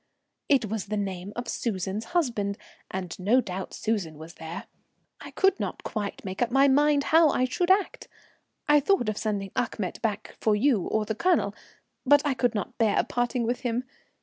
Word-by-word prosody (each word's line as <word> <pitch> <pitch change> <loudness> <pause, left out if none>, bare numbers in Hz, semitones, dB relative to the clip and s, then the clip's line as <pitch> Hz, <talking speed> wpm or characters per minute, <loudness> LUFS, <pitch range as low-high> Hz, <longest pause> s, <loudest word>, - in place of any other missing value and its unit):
"It 275 -5 +4
was 215 -1 -4
the 210 +1 -2
name 190 -1 -4
of 240 0 -4
Susan's 205 -2 -2
husband, 230 - -1 0.3
and 185 -2 -4
no 210 +8 +4
doubt 190 -5 -4
Susan 195 -9 -2
was 160 +2 -10
there. 160 +3 -7 0.5
I - - -9
could 390 0 +2
not - - -4
quite 205 -3 -4
make 190 +3 -5
up 240 - +2
my 270 +3 +5
mind 290 +1 +4
how 325 -1 +7
I 255 - +2
should 350 +8 -1
act. 385 0 +2 0.6
I 295 0 +6
thought 290 - +2
of 215 - -3
sending 200 -3 -2
Achmet 215 -6 -2
back 215 -3 -3
for 215 -1 +3
you 220 -4 +2
or 220 -1 0
the 220 - -2
Colonel, 305 - +1 0.5
but 290 +2 +5
I 285 - +2
could 245 -3 0
not 205 - -4
bear 220 -3 +3
parting 245 0 -1
with 240 +2 -1
him. 245 0 -1
225 Hz, 185 wpm, -27 LUFS, 200-270 Hz, 0.6 s, how